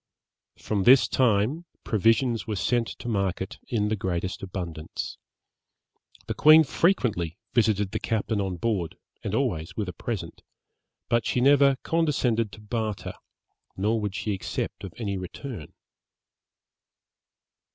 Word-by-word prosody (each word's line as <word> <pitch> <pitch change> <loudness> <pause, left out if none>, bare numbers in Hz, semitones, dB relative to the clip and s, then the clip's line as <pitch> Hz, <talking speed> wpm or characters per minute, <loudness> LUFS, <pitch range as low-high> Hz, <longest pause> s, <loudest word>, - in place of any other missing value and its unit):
From 105 -2 -1
this 125 +4 +7
time, 125 +7 +2 0.2
provisions 115 +2 +2
were 110 - -2
sent 120 +3 +1
to - - -8
market 95 -4 -2
in 105 -3 0
the 110 - +1
greatest 95 -1 -3
abundance. 85 -5 -5 1.1
The - - -2
queen 155 +2 +7
frequently 120 - +1 0.2
visited 105 -4 +2
the - - -2
captain 110 -1 -1
on 95 -2 -3
board, 90 -4 -1 0.3
and - - -2
always 80 +1 -1
with 105 -3 -1
a 90 - -5
present, 110 +4 -5 0.7
but 120 -2 +1
she - - +1
never 140 +1 +5
condescended 130 -9 +1
to 105 - -11
barter, 105 -1 -3 0.6
nor 110 +3 +1
would 105 -2 -3
she 105 - -2
accept 95 - -4
of 95 - -6
any 100 -5 -3
return. 95 - -7
110 Hz, 130 wpm, -26 LUFS, 95-120 Hz, 1.1 s, this